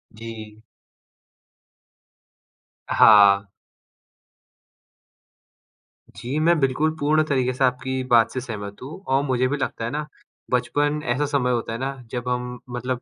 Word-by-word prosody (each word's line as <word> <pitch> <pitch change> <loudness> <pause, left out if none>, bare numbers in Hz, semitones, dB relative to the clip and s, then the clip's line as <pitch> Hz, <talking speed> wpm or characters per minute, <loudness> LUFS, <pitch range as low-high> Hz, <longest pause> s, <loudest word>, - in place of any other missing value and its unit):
जी। 110 -1 -10 2.3
हाँ। 100 -2 +6 2.6
जी, 120 +7 -5
मैं 165 +1 +3
बिल्कुल 140 +3 +1
पूर्ण 155 +2 +2
तरीके 130 -4 0
से 130 - -1
आपकी 130 +1 0
बात 115 -1 +5
से 130 - -3
सहमत 100 -4 -7
हूँ 145 +8 -9
और 135 +1 +2
मुझे 130 -2 +1
भी 145 +3 -2
लगता 115 -4 -3
है 115 - -3
ना, 150 +1 -4 0.4
बचपन 145 +4 0
ऐसा 145 +4 0
समय 140 -3 0
होता 115 -2 -2
है 115 - -5
ना 135 +1 -2 0.2
जब 125 0 -4
हम 125 0 -3
मतलब 125 0 -3
125 Hz, 130 wpm, -23 LUFS, 115-140 Hz, 2.6 s, हाँ